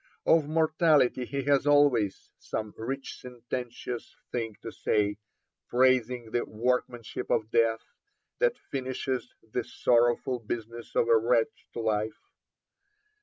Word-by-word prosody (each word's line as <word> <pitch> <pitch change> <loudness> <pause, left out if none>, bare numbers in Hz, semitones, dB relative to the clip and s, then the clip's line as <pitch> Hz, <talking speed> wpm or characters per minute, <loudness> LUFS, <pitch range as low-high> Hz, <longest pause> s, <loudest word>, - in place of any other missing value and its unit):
Of 160 -3 +4
mortality 155 -5 +3
he 140 +2 -3
has 140 +1 +2
always 140 -9 +3
some 110 -1 -4
rich 135 +4 -5
sententious 125 -1 -6 0.2
thing 115 -3 -3
to 115 - -5
say, 105 -2 0 0.5
praising 125 -2 +2
'the 120 - 0
workmanship 120 +1 -2
of 110 +1 0
death, 115 -1 +2 0.6
that - - +2
finishes 130 -1 -4
the 110 +2 -3
sorrowful 120 +1 +2
business 115 +1 -6
of - - +3
a 115 - +6
wretched 115 0 0
life.' 110 -1 -1
120 Hz, 115 wpm, -28 LUFS, 115-130 Hz, 0.6 s, a